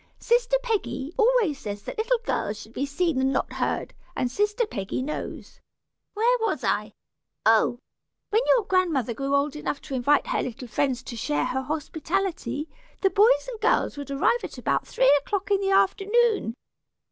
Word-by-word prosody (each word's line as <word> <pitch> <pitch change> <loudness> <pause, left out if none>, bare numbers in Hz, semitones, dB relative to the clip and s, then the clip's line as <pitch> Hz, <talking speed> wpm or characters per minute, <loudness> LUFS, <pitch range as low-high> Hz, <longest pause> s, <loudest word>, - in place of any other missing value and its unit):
Sister 485 +1 +2
Peggy 405 - -2
always 450 - +3
says 205 -1 -6
that 445 - -6
little 480 +3 +2
girls 210 +1 -1
should 220 - -12
be 275 +3 -2
seen 295 -1 0
and 265 0 +2
not - - -1
heard, - - -2 0.2
and 245 - -1
sister 420 - +1
Peggy 200 - -4
knows 300 +3 -6 0.6
Where 475 +4 +3
was 450 - -1
I - - 0 0.5
Oh! 225 +2 +4 0.5
when 440 +3 +4
your 465 -5 +1
grandmother 330 - +1
grew 275 +4 -1
old 280 +1 +1
enough 300 -1 -3
to - - -7
invite 270 +3 +3
her - - 0
little 250 0 -6
friends 255 +1 -1
to 240 - -7
share 145 -9 -1
her 265 - -1
hospitality, 310 0 -2 0.3
the 385 - +3
boys 445 +6 +4
and 470 -3 -7
girls - - +2
would 285 -1 -7
arrive 280 - +1
at - - -7
about - - -1
three - - +4
o'clock 405 +3 -3
in 400 -1 +3
the 390 - 0
afternoon. 400 - +2
315 Hz, 170 wpm, -25 LUFS, 265-430 Hz, 0.6 s, Oh